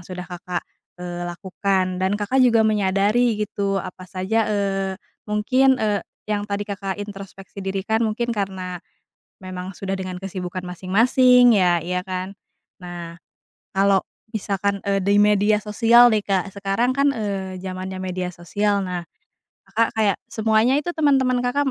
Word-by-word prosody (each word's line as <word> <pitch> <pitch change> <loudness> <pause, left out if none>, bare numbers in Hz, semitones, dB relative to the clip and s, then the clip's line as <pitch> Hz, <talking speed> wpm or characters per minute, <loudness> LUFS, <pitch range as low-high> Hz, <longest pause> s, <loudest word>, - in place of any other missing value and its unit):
sudah 180 0 -7
Kakak, 180 0 -5 0.3
eee, 175 0 -5
lakukan. 185 +1 -1
Dan 190 +2 +1
Kakak 210 +6 +1
juga 230 -3 +5
menyadari 210 +3 +2
gitu, 200 -1 -2
apa 185 -1 -6
saja, 210 +4 0
eee, 195 -2 -1 0.3
mungkin, 255 +6 +3
eee, 210 -4 0 0.3
yang 205 0 -1
tadi 200 0 -2
Kakak 195 -1 -4
introspeksi 195 -1 -10
diri 195 0 -3
kan, 220 +3 0
mungkin 235 +2 -2
karena 190 -4 -3 0.6
memang 185 0 -6
sudah 195 +1 -4
dengan 185 -1 -5
kesibukan 185 -1 -5
masing-masing 240 +7 +4
ya, 180 -3 +3
ya 180 +2 -3
kan? 185 +1 -5 0.5
Nah, 175 -1 -7 0.6
kalau 195 0 +3 0.2
misalkan, 200 -2 -1
eee, 195 0 +1
di 200 +2 +3
media 210 0 +4
sosial 230 +3 +5
nih, 215 - +2
Kak, 195 -1 -1
sekarang 200 +5 0
kan, 280 +1 +3
eee, 195 -6 -3
zamannya 185 0 -5
media 185 -1 -3
sosial, 200 +3 -1
nah, 180 -1 -3 0.6
Kakak 220 +4 +1
kayak 210 -3 +2
semuanya 220 +3 +2
itu 300 +4 -1
teman-teman 270 -6 +2
Kakak 270 +3 0
200 Hz, 145 wpm, -22 LUFS, 185-220 Hz, 0.6 s, juga